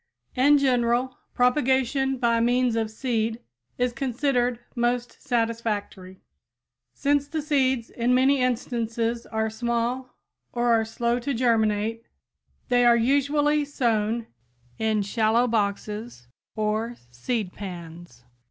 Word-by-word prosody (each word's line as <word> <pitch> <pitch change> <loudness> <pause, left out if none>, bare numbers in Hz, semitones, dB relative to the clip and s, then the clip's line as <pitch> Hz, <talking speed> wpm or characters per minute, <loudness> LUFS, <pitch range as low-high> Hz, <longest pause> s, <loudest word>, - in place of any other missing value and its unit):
In 285 +3 +5
general, 250 -1 +1 0.2
propagation 265 +1 +2
by 235 -2 +2
means 245 0 +2
of 225 -1 0
seed 225 -1 -2 0.4
is 250 -1 0
considered 250 -2 0 0.2
most 240 0 -1
satisfactory. 225 -6 -2 0.7
Since 285 0 0
the 315 +2 -3
seeds 265 -5 +1
in 245 +1 +1
many 265 +1 +3
instances 235 -2 -1
are 220 0 -1
small 235 +2 -2 0.4
or 240 -1 +2
are 225 -1 +2
slow 235 +2 -1
to 275 +2 -2
germinate, 225 -2 +1 0.7
they 245 0 +4
are 240 -1 +6
usually 285 +4 +2
sown 230 -5 0 0.5
in 220 -2 +1
shallow 220 +3 +2
boxes 210 - -2 0.3
or 215 +2 -1 0.2
seed 195 - -3
pans. 170 -8 -9
235 Hz, 110 wpm, -25 LUFS, 220-255 Hz, 0.7 s, are